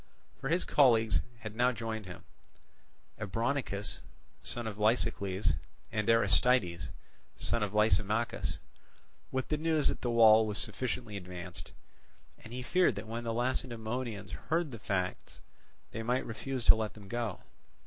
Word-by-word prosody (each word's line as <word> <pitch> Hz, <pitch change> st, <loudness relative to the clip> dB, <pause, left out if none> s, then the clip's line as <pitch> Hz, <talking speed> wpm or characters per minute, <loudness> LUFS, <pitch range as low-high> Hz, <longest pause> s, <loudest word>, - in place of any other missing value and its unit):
For 135 Hz, -, -3 dB
his 175 Hz, +3 st, +2 dB
colleagues 115 Hz, -6 st, +4 dB, 0.2 s
had 110 Hz, -1 st, -7 dB
now 125 Hz, +2 st, +3 dB
joined 110 Hz, -3 st, -4 dB
him, 90 Hz, -, -9 dB, 1.0 s
Abronichus, 110 Hz, 0 st, -2 dB, 0.4 s
son 120 Hz, -1 st, -2 dB
of 110 Hz, -2 st, -4 dB
Lysicles, 105 Hz, -5 st, +1 dB, 0.4 s
and 105 Hz, 0 st, -1 dB
Aristides, 105 Hz, -5 st, +3 dB, 0.5 s
son 115 Hz, -, 0 dB
of 105 Hz, 0 st, -2 dB
Lysimachus, 105 Hz, +2 st, +2 dB, 0.7 s
with 130 Hz, 0 st, -2 dB
the 150 Hz, -, 0 dB
news 160 Hz, -2 st, +2 dB
that -, -, -3 dB
the 120 Hz, -, -1 dB
wall 110 Hz, -2 st, +7 dB
was 105 Hz, -1 st, 0 dB
sufficiently 110 Hz, -1 st, -2 dB
advanced; 90 Hz, -2 st, -8 dB, 0.7 s
and 110 Hz, -, -12 dB
he 125 Hz, +1 st, -5 dB
feared 180 Hz, -, +3 dB
that 100 Hz, +2 st, -5 dB
when 115 Hz, +1 st, -4 dB
the 115 Hz, -, -1 dB
Lacedaemonians 115 Hz, -2 st, -2 dB, 0.2 s
heard 165 Hz, -1 st, +1 dB
the 115 Hz, -, -7 dB
facts, 95 Hz, -3 st, -3 dB, 0.5 s
they 110 Hz, -, -4 dB
might 125 Hz, +3 st, 0 dB
refuse 125 Hz, +2 st, -4 dB
to -, -, +10 dB
let 110 Hz, -1 st, -3 dB
them 105 Hz, -2 st, -12 dB
go. 115 Hz, -2 st, -3 dB
115 Hz, 140 wpm, -32 LUFS, 105-125 Hz, 1.0 s, to